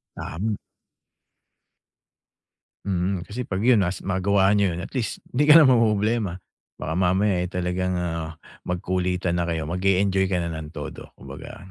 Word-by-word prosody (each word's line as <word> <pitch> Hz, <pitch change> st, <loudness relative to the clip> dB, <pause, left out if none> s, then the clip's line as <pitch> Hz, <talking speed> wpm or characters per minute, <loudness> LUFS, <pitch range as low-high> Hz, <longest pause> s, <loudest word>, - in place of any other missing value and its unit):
Tam 105 Hz, +7 st, -3 dB, 2.3 s
Mhm, 90 Hz, -1 st, -1 dB
kasi 115 Hz, +7 st, -6 dB
'pag 95 Hz, +1 st, -2 dB
yun 120 Hz, -2 st, +5 dB
nas- 95 Hz, -1 st, -1 dB
magawa 95 Hz, +1 st, +2 dB
niyo 100 Hz, -4 st, +2 dB
yun 85 Hz, -, -5 dB
at -, -, -8 dB
least, 125 Hz, -5 st, -3 dB
‘di 145 Hz, +4 st, +1 dB
ka 150 Hz, -, +9 dB
na 165 Hz, -, +9 dB
mamomroblema. 110 Hz, -6 st, +2 dB, 0.4 s
Baka 80 Hz, -, -4 dB
mamaya 95 Hz, +1 st, +2 dB
eh, 90 Hz, -, -1 dB
talagang, 90 Hz, +1 st, -2 dB
ah, 80 Hz, -2 st, -3 dB, 0.3 s
magkulitan 90 Hz, 0 st, -1 dB
na 85 Hz, -, -1 dB
kayo. 80 Hz, -1 st, -2 dB
Mag-e-enjoy 95 Hz, +1 st, +2 dB
ka 95 Hz, -, -1 dB
na 85 Hz, 0 st, -3 dB
nang 80 Hz, -1 st, -6 dB
todo 75 Hz, -, -7 dB
kumbaga -, -, -10 dB
95 Hz, 150 wpm, -24 LUFS, 90-105 Hz, 2.3 s, ka